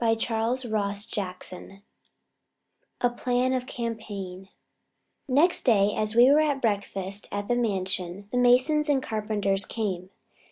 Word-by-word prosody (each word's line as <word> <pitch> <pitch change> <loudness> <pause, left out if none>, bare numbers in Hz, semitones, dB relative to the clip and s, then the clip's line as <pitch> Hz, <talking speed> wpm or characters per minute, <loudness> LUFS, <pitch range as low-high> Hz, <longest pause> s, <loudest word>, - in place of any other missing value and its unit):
CHAPTER 225 +1 0
XIII 200 -4 -4 1.2
The 245 - +4
Plan 250 +1 +1
of 255 -1 -2
Campaign 200 -5 -6 0.8
Next 300 +7 +4
day, 210 -4 +3
as 215 +1 -1
we 245 +3 +7
were 295 - +6
at 295 -3 +1
breakfast 200 -3 -2
at 205 0 -3
the 245 - +1
Mansion, 190 -4 -2
the 250 - +1
masons 260 +5 +4
and 270 -2 +2
carpenters 205 -3 -1
came. 190 -5 -4
220 Hz, 120 wpm, -26 LUFS, 200-250 Hz, 1.2 s, we